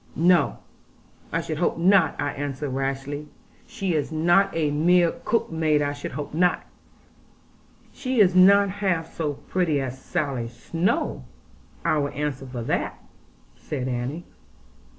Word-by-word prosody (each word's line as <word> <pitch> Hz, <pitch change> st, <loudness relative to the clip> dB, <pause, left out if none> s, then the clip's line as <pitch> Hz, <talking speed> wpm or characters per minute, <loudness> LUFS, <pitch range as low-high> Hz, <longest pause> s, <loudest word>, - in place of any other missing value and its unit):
'No, 170 Hz, -2 st, +3 dB, 0.7 s
I 165 Hz, -, 0 dB
should 155 Hz, -2 st, -4 dB
hope 175 Hz, -, +1 dB
not,' 190 Hz, +4 st, +4 dB
I 145 Hz, 0 st, -1 dB
answered 145 Hz, 0 st, -4 dB
rashly; 135 Hz, +2 st, -3 dB, 0.4 s
'she 190 Hz, -3 st, -2 dB
is 155 Hz, 0 st, -1 dB
not 175 Hz, +5 st, +3 dB
a 155 Hz, -3 st, +1 dB
mere 170 Hz, +3 st, +4 dB
cook 230 Hz, -5 st, 0 dB
maid 155 Hz, -2 st, +2 dB
I 145 Hz, 0 st, -1 dB
should 145 Hz, -, -7 dB
hope.' 145 Hz, +1 st, -5 dB, 1.6 s
'She 255 Hz, -2 st, -2 dB
is 190 Hz, -4 st, +6 dB
not 200 Hz, +2 st, +6 dB
half 185 Hz, -5 st, -1 dB
so 150 Hz, -3 st, -2 dB
pretty 165 Hz, -2 st, -1 dB
as 130 Hz, -1 st, -5 dB
Sally 140 Hz, -9 st, -2 dB
Snowe; 120 Hz, -, -2 dB, 0.6 s
I 155 Hz, -, +2 dB
will 145 Hz, 0 st, 0 dB
answer 140 Hz, -2 st, -3 dB
for 125 Hz, -2 st, -5 dB
that,' -, -, -2 dB, 0.6 s
said 130 Hz, -4 st, -5 dB
Annie. 130 Hz, +7 st, -3 dB
155 Hz, 135 wpm, -24 LUFS, 140-175 Hz, 1.6 s, is